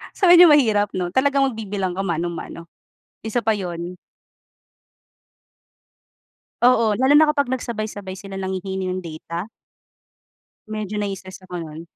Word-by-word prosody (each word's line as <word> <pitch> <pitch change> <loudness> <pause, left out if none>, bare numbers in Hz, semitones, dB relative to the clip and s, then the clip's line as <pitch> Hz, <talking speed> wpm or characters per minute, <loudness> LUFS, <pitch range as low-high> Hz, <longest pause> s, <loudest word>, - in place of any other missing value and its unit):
so - - -11
medyo 355 0 +9
mahirap 225 -9 +4
'no 180 -1 -2
talagang 275 +4 +2
magbibilang 205 -4 -3
ka 180 - -6
mano-mano 170 -1 -4 0.6
isa 225 +2 -2
pa 220 - +2
yun. 180 -3 -4 2.7
Oo, 230 -3 +4
lalo 270 +3 +5
na 310 - +7
kapag 285 -3 0
nagsabay-sabay 215 -6 -4
sila 195 -1 -8
nanghihingi 190 0 -3
ng 185 - -3
data. 170 +3 -7 1.2
Medyo 215 -1 -4
nai-stress 195 -2 -6
ako 180 -1 -7
nun. 155 0 -9
200 Hz, 120 wpm, -22 LUFS, 180-230 Hz, 2.7 s, medyo